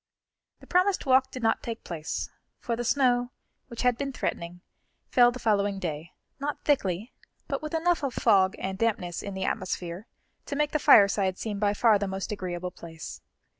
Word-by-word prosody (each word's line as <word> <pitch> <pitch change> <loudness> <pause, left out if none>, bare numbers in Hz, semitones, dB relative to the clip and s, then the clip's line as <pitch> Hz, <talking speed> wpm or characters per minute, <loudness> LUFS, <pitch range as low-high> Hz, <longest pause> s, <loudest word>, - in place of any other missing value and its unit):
The - - -13
promised 365 +1 +2
walk 265 0 +4
did 255 -2 -7
not 225 0 +2
take 230 -1 -6
place, 160 -2 -4 0.3
for 235 - -2
the 240 - -3
snow, 245 -1 +2 0.4
which 235 -1 -5
had 250 -1 +2
been 275 -1 -2
threatening, 175 -8 -4 0.5
fell 245 -1 +6
the 250 - -7
following 205 -4 +1
day, 165 -3 -5 0.3
not 285 +1 -4
thickly, 215 - 0 0.3
but 275 -2 -2
with 305 +1 -4
enough 340 +2 +2
of 270 -4 -2
fog 190 -1 +4
and 190 0 -4
dampness 190 -7 -1
in 200 -1 -6
the 190 0 -2
atmosphere 180 +2 -3 0.4
to 285 - -3
make 295 0 +1
the 305 - +1
fireside 200 -5 +5
seem 210 -3 -4
by 205 0 +1
far 220 -2 +4
the 200 - -1
most 190 +1 -4
agreeable 180 -3 -4
place. 165 -2 -9
215 Hz, 180 wpm, -27 LUFS, 190-255 Hz, 0.5 s, fell